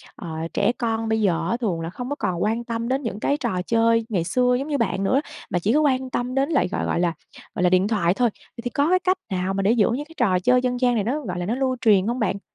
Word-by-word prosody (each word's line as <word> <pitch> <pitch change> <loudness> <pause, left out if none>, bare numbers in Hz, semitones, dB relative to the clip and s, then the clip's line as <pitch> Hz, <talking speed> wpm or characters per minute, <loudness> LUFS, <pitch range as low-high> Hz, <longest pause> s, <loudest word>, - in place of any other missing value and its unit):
ờ, 170 - -8 0.2
trẻ 205 +4 +2
con 225 -1 -1
bây 220 0 +1
giờ 170 -4 +1
á 235 - 0
thường 195 -9 -2
là 165 - -4
không 245 +7 -6
có 290 - -2
còn 180 -7 -2
quan 225 +3 0
tâm 230 0 -3
đến 265 +2 0
những 215 -3 -4
cái 285 +6 +1
trò 205 -9 -2
chơi 230 0 +3
ngày 185 -6 0
xưa 250 +8 +2
giống 280 - -4
như 290 -2 0
bạn 195 -4 -1
nữa, 260 +8 +2 0.3
mà 180 - 0
chỉ 205 +6 +1
có 305 - +4
quan 260 -3 +1
tâm 250 +1 -3
đến 275 +3 +1
lại, 275 - +2
gọi - - -2
gọi - - 0
là 175 -1 +1 0.4
gọi - - -1
là, 180 - +5
điện 185 +2 +3
thoại 190 -6 +2
thôi. 240 +3 +2
Vậy 235 - -14
thì 245 - -2
có 285 +6 +1
cái 370 0 +4
cách 370 0 +1
nào 185 +1 -1
mà 195 - -1
để 205 - +3
giữ 230 -3 +3
những 280 +5 -2
cái 325 +1 -17
trò 190 -7 +2
chơi 250 +6 +3
dân 250 -1 -1
gian 245 -1 +2
này 210 - +1
nó, 275 +8 -1
gọi 180 -7 -4
là, 175 - -3
nó 225 +6 -1
lưu 260 -1 0
truyền 205 -4 +4
hông 240 +2 -1
bạn? 200 -3 -1
230 Hz, 300 wpm, -23 LUFS, 190-255 Hz, 0.4 s, là